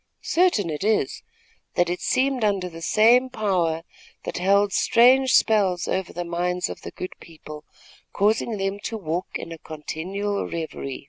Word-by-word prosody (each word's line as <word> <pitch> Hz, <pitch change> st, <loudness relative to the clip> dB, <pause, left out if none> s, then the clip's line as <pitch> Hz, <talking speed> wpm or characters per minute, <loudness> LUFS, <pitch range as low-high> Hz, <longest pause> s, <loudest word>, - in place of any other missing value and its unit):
Certain 325 Hz, -, +2 dB
it 150 Hz, +4 st, -4 dB
is, 215 Hz, +1 st, 0 dB, 0.5 s
that 175 Hz, -, +3 dB
it 175 Hz, +1 st, -3 dB
seemed 260 Hz, -1 st, +1 dB
under 200 Hz, -3 st, +1 dB
the 165 Hz, -1 st, -10 dB
same 235 Hz, +8 st, +4 dB
power, 180 Hz, -9 st, 0 dB, 0.4 s
that -, -, -4 dB
held 200 Hz, +2 st, +3 dB
strange 255 Hz, +3 st, +4 dB
spells 195 Hz, -5 st, +3 dB
over 190 Hz, -1 st, -2 dB
the 175 Hz, 0 st, -5 dB
minds 180 Hz, +1 st, -1 dB
of -, -, -8 dB
the -, -, -7 dB
good 185 Hz, -, -7 dB
people, 155 Hz, -2 st, -11 dB, 0.5 s
causing 215 Hz, +2 st, +1 dB
them 195 Hz, +1 st, -2 dB
to 225 Hz, +2 st, -4 dB
walk 175 Hz, -2 st, -3 dB
in 165 Hz, -, -5 dB
a 165 Hz, -, -8 dB
continual 185 Hz, +7 st, -4 dB
revery. 160 Hz, -5 st, -5 dB
190 Hz, 155 wpm, -24 LUFS, 170-215 Hz, 0.5 s, same